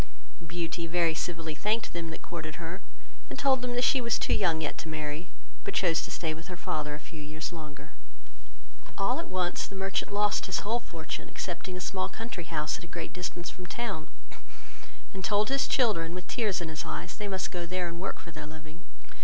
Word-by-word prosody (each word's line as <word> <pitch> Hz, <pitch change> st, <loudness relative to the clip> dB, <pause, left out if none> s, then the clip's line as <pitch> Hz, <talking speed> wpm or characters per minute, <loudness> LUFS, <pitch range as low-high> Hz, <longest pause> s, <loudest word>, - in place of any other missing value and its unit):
Beauty 170 Hz, 0 st, -1 dB
very 165 Hz, -1 st, +4 dB
civilly 165 Hz, -1 st, -1 dB
thanked 210 Hz, +8 st, +1 dB
them 170 Hz, -1 st, -2 dB
that 160 Hz, -, -6 dB
courted 160 Hz, -3 st, -4 dB
her, 170 Hz, +3 st, -4 dB, 0.5 s
and -, -, -4 dB
told 265 Hz, -2 st, +5 dB
them 245 Hz, -1 st, +1 dB
she 260 Hz, +1 st, +6 dB
was 235 Hz, -1 st, +4 dB
too -, -, +3 dB
young 170 Hz, -5 st, +4 dB
yet 155 Hz, -2 st, 0 dB
to -, -, -4 dB
marry, 155 Hz, +2 st, -2 dB, 0.3 s
but 400 Hz, -, -2 dB
chose 165 Hz, -3 st, +5 dB
to -, -, -3 dB
stay 160 Hz, -2 st, 0 dB
with 165 Hz, +2 st, -8 dB
her 180 Hz, -2 st, -5 dB
father 150 Hz, -2 st, -1 dB
a -, -, -6 dB
few 155 Hz, 0 st, -8 dB
years 155 Hz, +3 st, -3 dB
longer. 150 Hz, -3 st, -7 dB, 1.1 s
All 245 Hz, +9 st, +3 dB
at 335 Hz, -, -3 dB
once 180 Hz, -1 st, +1 dB
the 195 Hz, -, -8 dB
merchant 195 Hz, +1 st, +1 dB
lost 205 Hz, 0 st, +3 dB
his -, -, +2 dB
whole 230 Hz, +4 st, +2 dB
fortune, 165 Hz, -8 st, -5 dB
excepting 180 Hz, +1 st, -3 dB
a -, -, -3 dB
small 185 Hz, +1 st, 0 dB
country 225 Hz, -7 st, -4 dB
house 155 Hz, +3 st, 0 dB
at -, -, -9 dB
a -, -, -7 dB
great 170 Hz, +1 st, -4 dB
distance 180 Hz, -1 st, -2 dB
from 180 Hz, 0 st, -8 dB
town, 170 Hz, -6 st, -2 dB, 1.1 s
and 190 Hz, -1 st, -4 dB
told 210 Hz, +3 st, +4 dB
his 275 Hz, 0 st, +4 dB
children, 185 Hz, -10 st, +4 dB
with 180 Hz, 0 st, -5 dB
tears 210 Hz, -7 st, +2 dB
in 165 Hz, -, -2 dB
his 155 Hz, -2 st, -2 dB
eyes, 80 Hz, +2 st, -3 dB
they 210 Hz, -, -2 dB
most 190 Hz, -1 st, 0 dB
go 175 Hz, -1 st, -2 dB
there 180 Hz, 0 st, +1 dB
and 170 Hz, 0 st, -4 dB
work 195 Hz, -, -1 dB
for 170 Hz, -, -9 dB
their 150 Hz, -1 st, -6 dB
living. 155 Hz, +2 st, -9 dB
175 Hz, 210 wpm, -31 LUFS, 160-195 Hz, 1.1 s, she